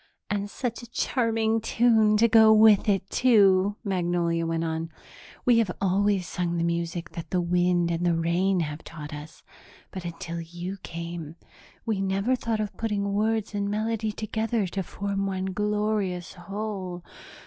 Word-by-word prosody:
"And 205 0 -1
such 235 +1 -4
a 240 - -12
charming 225 -3 0
tune 220 -2 +3
to 230 +2 +5
go 220 -1 +7
with 215 -1 +6
it, 195 -1 +1
too," 205 -5 +4
Magnolia 175 -4 0
went 165 0 -1
on. 160 0 -3 0.6
"We 240 -2 +5
have 220 -4 +1
always 195 -1 +1
sung 175 -1 -2
the 165 - 0
music 170 -1 -2
that 170 -1 -7
the 180 - +1
wind 175 0 +2
and 170 +1 -1
the 175 -1 +2
rain 175 +3 +1
have 150 0 -4
taught 150 -2 -8
us, 150 +2 -10 0.5
but, 185 -3 -6
until 170 0 -5
you 175 +3 -6
came, 170 -2 -6 0.5
we 215 -4 -1
never 195 +6 +1
thought 230 -3 -2
of 210 -2 -3
putting 205 -3 -1
words 215 +1 0
and 200 0 -1
melody 220 +1 -1
together 220 0 -1
to 190 +2 -3
form 195 +2 -3
one 190 -1 -2
glorious 210 -3 -1
whole. 190 -1 -5
195 Hz, 160 wpm, -26 LUFS, 170-215 Hz, 0.6 s, go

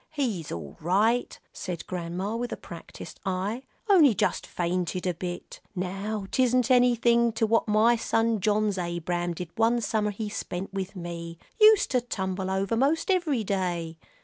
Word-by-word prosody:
"He's 235 - -2
all 80 -4 -7
right," 210 +9 +1
said 175 -3 -5
Grandma, 180 +4 -3
with 240 +1 -3
a - - -4
practised - - -10
eye; 195 +6 -2 0.3
"only 320 - +6
just - - 0
fainted 180 +1 -2
a 180 - +1
bit. 175 +1 -6 0.2
Now 195 +3 -3
'tisn't 255 -1 +2
anything 235 -1 +4
to 225 0 +1
what 230 +1 +2
my 215 +3 +4
son 225 -1 +1
John's 210 0 +1
Abram 175 0 -2
did 175 0 -6
one 230 +1 +3
summer 215 -2 0
he 210 +1 -4
spent 195 -2 -5
with 195 +1 -4
me. 170 -1 -6 0.2
Used 430 -1 +6
to 250 -1 +2
tumble 190 -5 -3
over 195 +3 0
most 290 - +2
every 315 -11 +1
day." 175 -5 -2
205 Hz, 155 wpm, -27 LUFS, 180-235 Hz, 0.3 s, only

